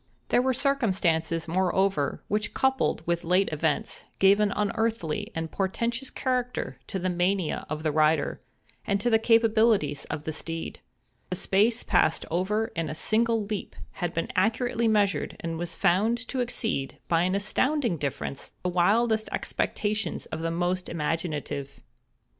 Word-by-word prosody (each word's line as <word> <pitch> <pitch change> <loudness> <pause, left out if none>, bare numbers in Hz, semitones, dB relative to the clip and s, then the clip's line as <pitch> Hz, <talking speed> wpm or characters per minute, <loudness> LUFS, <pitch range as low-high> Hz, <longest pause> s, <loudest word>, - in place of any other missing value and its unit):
There 245 - +4
were 260 +1 +2
circumstances, 185 - +1
moreover, 185 -3 +1
which 210 +1 -1
coupled 265 -10 +1
with 170 0 0
late 180 +3 +2
events, 155 0 -1
gave 195 +1 +5
an 210 -1 +2
unearthly 210 -5 -1
and 165 0 -3
portentous 230 +6 -2
character 250 -2 -2
to 195 - -3
the 185 0 -1
mania 180 -1 0
of 155 +1 -4
the 155 - +1
rider, 155 0 +2 0.4
and 200 -1 0
to 240 +4 0
the 225 - +5
capabilities 220 -9 +3
of 150 -1 -5
the 155 - -3
steed. 165 +1 -5 0.5
The 180 - -1
space 215 +6 +2
passed 175 -4 +2
over 210 +6 0
in 165 -2 -1
a 155 - -4
single 225 +4 +1
leap 210 -1 -5 0.2
had 175 -1 -3
been 165 - -2
accurately 230 +4 +1
measured, 205 -3 +1
and 165 -1 -3
was 170 -1 -4
found 200 +5 +3
to 265 - -2
exceed, 220 - -2
by 165 -1 +3
an 185 +2 +1
astounding 235 - +1
difference, 140 -1 -4
the 180 - 0
wildest 220 +5 +2
expectations 215 +1 -2
of 160 - -3
the 165 - -1
most 175 +2 -1
imaginative. 150 -3 -3
190 Hz, 150 wpm, -27 LUFS, 165-225 Hz, 0.5 s, gave